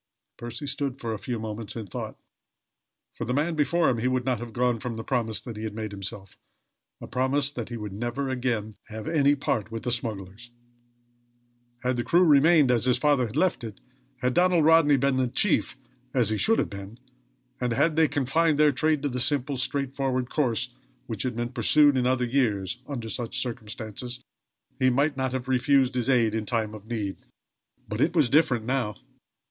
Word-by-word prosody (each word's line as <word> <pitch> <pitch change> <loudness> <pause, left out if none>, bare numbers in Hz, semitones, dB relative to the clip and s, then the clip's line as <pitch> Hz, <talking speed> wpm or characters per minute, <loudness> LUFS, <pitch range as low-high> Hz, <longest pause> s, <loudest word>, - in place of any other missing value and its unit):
Percy 120 +3 -6
stood 140 -2 -2
for 115 -2 -3
a 105 - -5
few 120 +4 -3
moments 110 -1 -5
in 115 -2 -5
thought. 95 - -6 1.0
For - - -5
the 125 +3 -1
man 155 +4 +1
before 160 +2 +2
him 120 - +1
he 120 - 0
would 130 -1 0
not 125 -4 0
have 120 -1 -7
gone 120 0 +1
from 120 -2 -4
the 115 - -5
promise 115 -3 -1
he 110 -3 -7
had 110 -1 -4
made 110 -1 -4
himself 100 -1 -7 0.6
a - - -8
promise 135 +2 0
that 120 -5 -6
he 120 - -5
would 105 -3 -6
never 120 +6 -3
again 120 -5 -2
have 110 -1 -7
any 145 -3 +3
part 110 -6 -1
with 115 0 -6
the 125 - -1
smugglers. 110 -1 -4 1.3
Had 125 0 0
the 120 - 0
crew 175 +7 +4
remained 150 -2 +5
as 120 -1 +1
his 125 - +3
father 145 -5 +2
had 110 - -10
left 180 -3 +1
it 110 -4 -7 0.4
had 125 0 +1
Donald 175 -1 +4
Rodney 160 -3 +6
been 135 0 +1
the 130 -1 +2
chief, 155 +2 0 0.4
as 120 -5 +3
he 110 - 0
should 225 - +3
have - - -1
been 100 +3 -8 0.6
and, 125 -1 -1
had 155 +7 +2
they 160 0 +4
confined 150 +2 +1
their 150 -1 +5
trade 150 +2 +1
to - - +1
the 125 -1 -3
simple, 140 +1 +1
straightforward 130 -1 -1
course 125 -4 0 0.3
which 110 -4 -4
had 125 -3 -2
been 120 0 -2
pursued 140 +4 +4
in 125 -1 +2
other 125 -1 +2
years, 120 -4 0
under 120 -6 -5
such 115 +1 -3
circumstances 115 +1 -5 0.6
he 130 -1 +4
might 140 +4 +1
not 130 -1 -1
have 130 -1 -4
refused 130 0 +3
his 125 0 -1
aid 115 -4 +3
in 110 - 0
a - - -8
time 110 -3 -1
of 110 0 -11
need; 105 -5 -3 0.7
but 105 +3 -3
it 170 +4 +2
was 145 -8 +3
different 135 -7 +3
now. 125 -5 -1
125 Hz, 195 wpm, -26 LUFS, 115-140 Hz, 1.3 s, Rodney